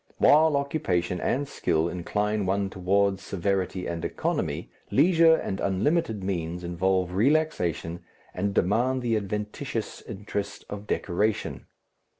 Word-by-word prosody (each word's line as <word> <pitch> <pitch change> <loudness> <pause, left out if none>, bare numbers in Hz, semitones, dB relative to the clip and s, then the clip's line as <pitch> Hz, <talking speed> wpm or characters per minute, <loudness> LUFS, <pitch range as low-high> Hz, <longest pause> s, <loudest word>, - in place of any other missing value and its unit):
While 155 0 +5
occupation 95 - -1
and 140 +2 0
skill 80 - 0
incline 105 +4 -1
one 100 0 0
towards 95 +1 +1
severity 95 -1 -1
and 85 -1 -4
economy, - - -2 0.2
leisure 165 +2 +5
and 95 - -3
unlimited 110 - 0
means 90 -2 -3
involve 90 +1 0
relaxation 95 - +1 0.3
and 100 +2 -1
demand 125 +7 +2
the 115 -2 +1
adventitious 105 +3 -3
interest 100 -1 -5
of 105 0 -6
decoration. 105 +4 -1
100 Hz, 115 wpm, -27 LUFS, 90-120 Hz, 0.3 s, While